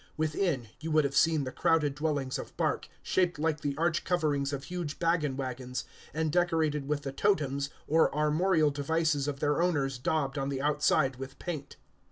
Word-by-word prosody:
Within, 155 - 0
you 160 - -5
would 155 -1 +4
have 140 0 -2
seen 160 -3 +4
the 130 - -4
crowded 150 -2 +2
dwellings 145 -3 -1
of - - -9
bark, - - 0
shaped 180 -2 +1
like 155 0 0
the 140 -2 -2
arched 165 0 +1
coverings 150 -6 0
of 140 -1 -4
huge 175 -4 -4
baggage 165 -4 +1
wagons, 130 -1 -4 0.3
and 160 0 -1
decorated 160 -4 +1
with 145 0 -1
the 135 - -3
totems 140 -3 +1 0.2
or 160 +2 +4
armorial 155 +1 +2
devices 145 0 0
of 145 -1 -3
their 150 +2 +2
owners 140 -7 0
daubed 140 0 0
on 135 0 -1
the 135 -1 -2
outside 145 -2 +2
with 135 +1 -8
paint. 155 -6 -5
150 Hz, 180 wpm, -30 LUFS, 140-160 Hz, 0.3 s, would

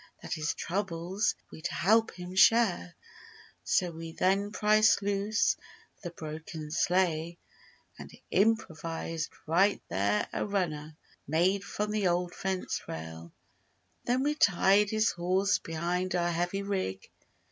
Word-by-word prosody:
That - - -4
his 155 0 -2
troubles 190 +1 -1 0.2
we'd 160 +2 -5
help 220 +5 +3
him 180 0 -7
share— 190 -3 +4 0.7
So 180 -3 +1
we 165 0 -8
then 195 +3 +1
pried 215 +1 +2 0.2
loose 205 +1 +1 0.5
the 175 - -5
broken 155 -1 -7
sleigh 170 -1 +1 0.6
And - - -9 0.2
improvised 165 -6 0 0.2
right 190 +6 +3
there 100 +2 +1
A - - -1
"runner" 155 -7 -2 0.3
made 180 +6 +2
from 210 +1 -3
the 210 -3 +1
old 175 0 0
fence 190 -1 -3
rail. 80 +1 -7 0.7
Then 250 +2 +1
we 295 +1 +1
tied 200 - +4
his 215 0 +2
horse 185 +2 +1
behind 175 +3 -2
Our 175 -1 +1
heavy 175 +4 -1
rig. 185 - -3
180 Hz, 125 wpm, -30 LUFS, 165-200 Hz, 0.7 s, share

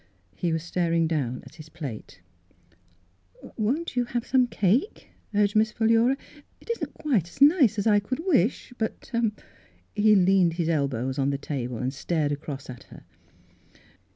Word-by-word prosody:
He 175 - -1
was 160 0 -1
staring 170 -1 0
down 140 -6 -2
at - - -15
his 155 -1 -11
plate. 135 - -8 1.3
"Won't 255 +9 -1
you 245 -1 +1
have 240 0 -3
some 255 -2 +3
cake?" 225 - 0 0.3
urged 205 0 +2
Miss 215 0 +3
Philura. 230 +4 +3 0.2
" - - -28
It - - -6
isn't 465 - -4
quite 230 - 0
as - - -16
nice 285 - +5
as 200 - -1
I 210 -2 +5
could 255 - -5
wish, 260 - +1
but 220 +3 -4 0.3
— - - -26
" - - -35
He 215 0 +5
leaned 185 -2 +4
his 170 -1 -1
elbows 135 -4 -1
on 135 0 +2
the 140 - -1
table 125 -4 -4
and 130 +3 -2
stared 150 0 -1
across 145 -1 -5
at 125 -2 -10
her. - - -14
185 Hz, 170 wpm, -26 LUFS, 145-230 Hz, 1.3 s, nice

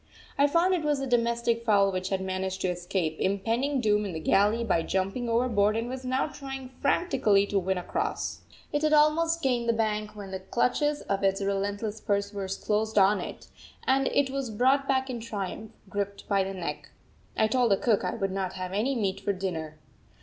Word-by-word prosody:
I 285 +1 +4
found 335 +5 +3
it 355 - +1
was 295 -2 +1
a 270 - -2
domestic 235 -1 +1
fowl 200 -3 +4
which 185 0 -3
had 190 -1 -1
managed 190 0 -3
to 185 - +1
escape 175 -2 -2
impending 230 +8 0
doom 210 -3 +2
in 195 -3 -4
the 160 - -4
galley 205 +8 +3
by 170 -7 +2
jumping 195 +8 -1
overboard 225 -3 +2
and 230 +1 -2
was 260 +1 -5
now 255 +1 0
trying 270 -3 -7
frantically 220 - +3
to 200 -1 0
win 190 0 -1
across. 180 - -3 0.3
It 295 - +1
had 310 0 +2
almost 325 +2 +3
gained 245 -3 +1
the - - +4
bank 215 -1 -1
when 200 -2 -8
the 190 - -4
clutches 290 +9 0
of 200 0 -2
its 195 0 +2
relentless 200 +2 -2
pursuers 200 -1 -2
closed 215 +1 -1
on 195 +1 +5
it, - - -7 0.4
and 270 0 +3
it 275 -2 +1
was 270 -2 -3
brought 265 +5 +2
back 265 -1 +1
in 240 - -4
triumph, 215 -1 -5 0.2
gripped 200 0 -4
by 200 -2 +2
the 195 0 -5
neck. 175 -2 -5 0.5
I 220 - +4
told 240 +2 +2
the 195 - +4
cook 220 -2 +2
I - - -2
would 195 -4 -2
not 190 -1 -2
have 185 0 -5
any 240 +7 0
meat 195 -5 -1
for 200 - -1
dinner. 165 -5 -4
210 Hz, 200 wpm, -28 LUFS, 195-255 Hz, 0.5 s, on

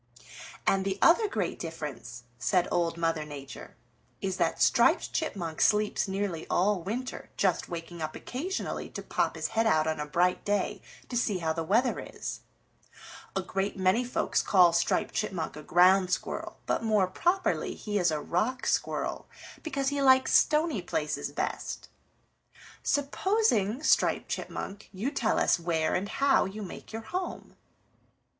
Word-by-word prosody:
"And 195 0 +3
the 195 0 -2
other 420 +6 +5
great 200 - -2
difference," 150 -7 -6 0.2
said 180 +4 +2
Old 170 -1 0
Mother 165 -2 0
Nature, 140 -2 -10 0.4
"is 190 -1 -2
that - - 0
Striped - - +3
Chipmunk 180 - -3
sleeps 210 0 +2
nearly 190 -4 -3
all 190 +1 +2
winter, 235 +8 -5
just 190 -3 +1
waking 170 0 -6
up 155 0 -4
occasionally 345 +10 -4
to - - -7
pop - - 0
his - - -2
head 225 0 +1
out 155 -7 +3
on 160 -1 -1
a 150 - -3
bright 180 +4 +1
day 205 0 -1 0.3
to 245 - -6
see 220 -5 +1
how 160 -2 -1
the 165 0 -3
weather 230 +9 +2
is. - - -6 1.0
A 195 - 0
great 195 +2 -2
many 190 +6 +3
folks 245 - 0
call 180 -4 +5
Striped 170 - +1
Chipmunk 190 -8 -2
a 150 - -8
Ground 180 +4 +4
Squirrel, 180 - -3
but - - 0
more 215 -4 +3
properly 350 - 0
he 205 -1 -2
is 175 -2 +3
a 155 -1 -1
Rock 220 - -1
Squirrel - - -1 0.3
because 275 -4 -1
he 285 0 -1
likes 260 -1 +5
stony 310 +2 +3
places - - -2
best. - - -4 0.9
Supposing, 285 - +1
Striped - - +2
Chipmunk, 200 +2 -5
you 210 +8 -3
tell 235 -6 0
us - - +3
where 165 -2 0
and 195 +3 -1
how 275 -1 +3
you 205 +3 -6
make 190 - -9
your 225 0 -6
home." 360 +10 -5
195 Hz, 155 wpm, -29 LUFS, 170-245 Hz, 1.0 s, other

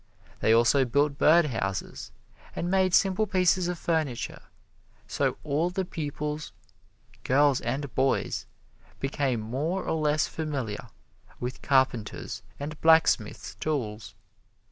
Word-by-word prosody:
They 110 - +2
also 120 +4 +5
built 140 +3 +1
bird 170 +2 +6
houses, 100 -8 -4 0.4
and 175 +1 -2
made 190 -1 +3
simple 195 +2 +3
pieces 185 -1 +2
of 180 -1 -2
furniture, 155 -8 -2 0.7
so - - -1
all 155 +4 0
the 190 +1 -2
pupils, 150 -1 -4 0.7
girls 140 0 +3
and 135 +3 -3
boys, 135 +1 0 0.5
became 135 -3 -1
more 145 - -2
or - - -1
less 150 0 +2
familiar 140 -9 -4 0.5
with 125 +1 -5
carpenter's 130 -5 0 0.2
and 150 +2 -6
blacksmith's 160 -9 +3
tools. 115 -8 -4
145 Hz, 115 wpm, -27 LUFS, 130-165 Hz, 0.7 s, bird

